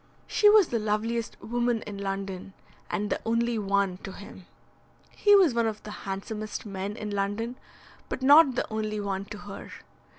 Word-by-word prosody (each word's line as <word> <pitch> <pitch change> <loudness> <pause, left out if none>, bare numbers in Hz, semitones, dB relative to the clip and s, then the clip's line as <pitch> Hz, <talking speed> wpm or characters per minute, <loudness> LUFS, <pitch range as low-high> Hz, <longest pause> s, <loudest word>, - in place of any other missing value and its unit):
She 420 - +4
was 415 -4 +6
the 235 - 0
loveliest 220 +2 -2
woman 240 -1 0
in 205 -1 -7
London, 195 -1 -4 0.4
and 210 0 -2
the - - -1
only 230 0 +1
one 200 -2 +1
to 195 - -8
him. 195 -2 -12 0.6
He 410 -1 +5
was 365 -9 +5
one 235 -1 +2
of 215 -1 -4
the 210 - -8
handsomest 210 +2 -5
men 200 +1 -5
in 210 -1 -5
London, 205 +4 -2 0.5
but 260 - -4
not 285 -1 +7
the - - 0
only 215 -1 -2
one 195 -1 -3
to 210 - -8
her. 205 -1 -9
215 Hz, 170 wpm, -27 LUFS, 200-235 Hz, 0.6 s, not